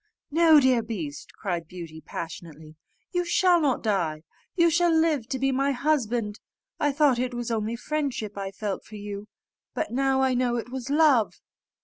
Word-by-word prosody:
"No, 320 0 +6
dear 260 -3 +3
beast," 180 -11 -6
cried 175 -4 -3
Beauty, 165 -3 -9
passionately, 160 -2 -8 0.4
"you 355 0 0
shall 350 0 +3
not 275 -5 +1
die; 170 -8 0 0.3
you 340 -2 +4
shall 345 +2 +3
live 320 -7 +2
to 260 - -2
be 270 +1 +1
my 275 +2 +1
husband. 245 -6 0 0.4
I 295 -1 +2
thought 280 -3 +3
it 250 0 -2
was 240 -1 -3
only 220 0 -1
friendship 265 -6 -3
I 195 -1 -4
felt 195 0 -4
for 215 - -12
you, 205 0 -7 0.5
but - - -2
now 265 +1 +2
I 260 -1 +2
know 245 -1 +1
it 240 +1 -4
was 260 0 -5
love." 285 -7 +4
245 Hz, 170 wpm, -26 LUFS, 205-285 Hz, 0.5 s, No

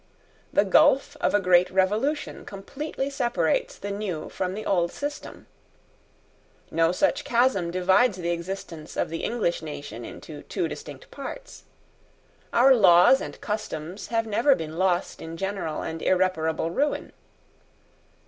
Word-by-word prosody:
The - - +3
gulph 285 -1 +4
of 295 - +1
a - - +5
great 180 -2 +4
revolution 210 +11 0
completely 270 +8 -5
separates 240 - 0
the 200 - -5
new 200 -6 -4
from 185 0 -3
the 215 +1 -6
old 175 -3 +1
system. 290 +1 -6 1.3
No 165 0 +3
such 275 +9 +1
chasm 235 -8 +2
divides 190 +5 +3
the 175 -1 -2
existence 170 -2 -6
of - - 0
the 165 0 -5
English 220 -9 -1
nation 150 -2 -7
into - - -9
two - - -2
distinct - - -9
parts. - - -9 0.9
Our 260 +3 +6
laws 190 +2 +6
and - - -7
customs 195 -3 -5
have 225 -1 0
never 230 +6 +3
been 160 +1 -6
lost 185 -1 0
in 165 0 -7
general 190 -4 -3
and 160 0 -5
irreparable 165 -3 +1
ruin. 290 - -1
190 Hz, 135 wpm, -25 LUFS, 170-240 Hz, 1.3 s, Our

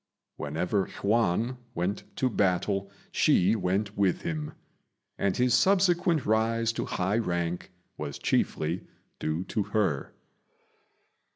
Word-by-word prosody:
Whenever 90 +7 -1
Yüan 115 +3 +1 0.2
went 90 +4 -2
to 130 - +1
battle 100 -2 +1 0.2
she 95 +5 +4
went 100 +1 -1
with 100 -3 +1
him; 155 -2 -3 0.7
and 100 -2 +1
his 125 0 +3
subsequent 180 -5 +3
rise 115 +1 +2
to - - -2
high 95 +5 0
rank 85 -4 -2 0.3
was - - -4
chiefly 80 +4 0 0.3
due 80 +3 -1
to 105 +3 -2
her. 100 -8 -1
100 Hz, 110 wpm, -28 LUFS, 90-115 Hz, 0.7 s, she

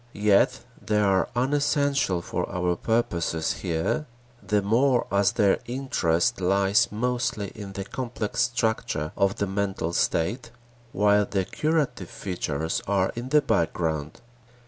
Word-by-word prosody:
Yet 105 -1 +3 0.2
they 105 -1 +1
are 95 -3 +2
unessential 140 - +1
for - - -3
our 90 -1 0
purposes 85 -7 0
here, 85 - -1 0.3
the 105 -1 0
more 120 +5 +3
as 100 0 +3
their 100 -2 +3
interest 95 -11 0
lies 100 +5 +3
mostly 120 -2 -1
in 100 -3 -9
the 95 0 -5
complex 120 0 -3
structure 110 -10 -1
of 100 0 +1
the 100 - -1
mental 95 -3 -2
state 115 +10 0 0.4
while 105 -1 +3
the 95 -2 -1
curative 150 - -1
features 80 -4 -3
are 95 -1 +1
in 120 +2 -5
the 150 +1 +4
background. 80 -3 -1
100 Hz, 125 wpm, -25 LUFS, 90-120 Hz, 0.4 s, the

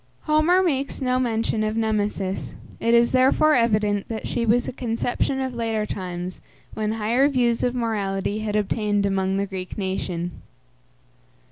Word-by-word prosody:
Homer 315 +5 +3
makes 280 -6 -1
no 255 -1 +1
mention 225 -3 0
of 215 +1 -1
Nemesis; 210 -3 -1 0.2
it 230 +1 +3
is 235 0 +4
therefore 265 +4 +4
evident 210 -5 +2
that 225 -1 -4
she 235 -1 -1
was 240 +3 +3
a - - -4
conception 245 +2 -1
of 260 -1 -2
later 225 -2 -1
times, 180 -2 -5 0.3
when 215 0 -1
higher 225 +5 +2
views 240 -4 +1
of 245 0 0
morality 205 -3 -1
had 215 -1 -2
obtained 205 -1 +1
among 195 -1 0
the 200 - 0
Greek 190 0 -6
nation. 185 -3 -2
220 Hz, 150 wpm, -23 LUFS, 200-245 Hz, 0.3 s, is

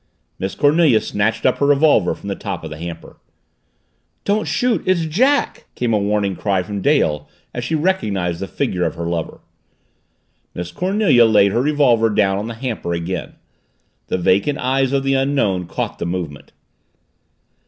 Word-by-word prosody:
Miss 95 +1 -3
Cornelia 145 -5 +4
snatched 105 +2 -1
up 130 - +2
her 140 - +2
revolver 145 +1 +3
from - - -11
the 100 - -2
top 100 -5 -5
of 80 - -7
the 75 - -8
hamper. 85 -1 -8 1.1
"Don't 210 +1 0
shoot 245 -2 +1
it's 180 -3 +2
Jack!" 255 - +1
came 120 -2 -1
a 105 - +3
warning 100 -1 0
cry 95 -2 0
from 100 +1 -5
Dale 75 - +1 0.2
as 120 - -4
she 160 +7 -1
recognized 105 - -1
the 95 - -4
figure 95 -10 -2
of - - -1
her 85 - -4
lover. 85 -1 -4 1.1
Miss 90 0 -5
Cornelia 185 - +3
laid 105 -3 +4
her 120 - +1
revolver 130 -6 +3
down 100 -2 +1
on 105 - -4
the 115 - -6
hamper 115 -8 -3
again. 85 +1 -4 0.7
The - - -1
vacant 100 +11 +1
eyes 135 +1 0
of 135 -1 +1
the 135 0 +1
Unknown 135 -10 0
caught - - -4
the - - -2
movement. 85 -5 -5
110 Hz, 165 wpm, -19 LUFS, 95-145 Hz, 1.1 s, Cornelia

